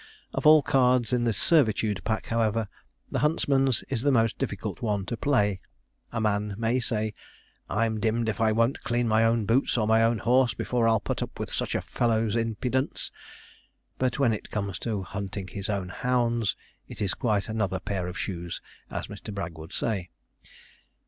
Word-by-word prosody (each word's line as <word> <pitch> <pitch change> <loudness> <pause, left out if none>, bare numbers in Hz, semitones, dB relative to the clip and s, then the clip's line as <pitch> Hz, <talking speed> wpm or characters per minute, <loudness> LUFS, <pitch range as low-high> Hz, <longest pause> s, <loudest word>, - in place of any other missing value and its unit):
Of - - +1
all 155 -1 +8
cards 125 -3 +3
in 120 -1 +2
the 115 - +3
servitude 110 - +2
pack, 110 -1 -1
however, 115 -1 0 0.4
the - - 0
huntsman's 135 -5 +2
is 130 -4 -2
the 145 +2 +3
most 115 -3 +2
difficult - - -3
one 105 -4 -1
to 120 - -3
play. 105 -8 +1 0.5
A 115 - -2
man 105 -1 0
may 115 +3 +1
say, 110 -3 -1 0.6
'I'm 110 0 0
dim'd 115 +1 +1
if 110 0 -1
I 110 -1 +4
won't 115 +4 +1
clean 120 0 0
my 110 0 +4
own 115 -1 +2
boots 120 +4 +2
or 110 - +2
my 110 0 +5
own 115 0 +3
horse, 125 +2 +3
before 120 -2 +1
I'll 110 -1 +4
put - - -3
up - - -5
with - - -4
such - - -2
a - - -1
fellow's 115 -2 +1
impudence'; 120 +4 -1 0.9
but 130 -1 +1
when 130 -5 +3
it 105 - -6
comes 100 -3 -3
to 105 -5 -2
hunting 100 0 -5
his 100 +1 -5
own 100 -3 -2
hounds, 120 -1 0 0.3
it - - -9
is 100 -3 0
quite 105 -4 0
another 105 -4 -1
pair 95 -3 -3
of 90 - -6
shoes, 85 -2 -4 0.3
as - - -4
Mr. - - -8
Bragg 95 -5 -4
would 80 +3 -9
say. 95 -6 -2
115 Hz, 180 wpm, -27 LUFS, 100-120 Hz, 0.9 s, all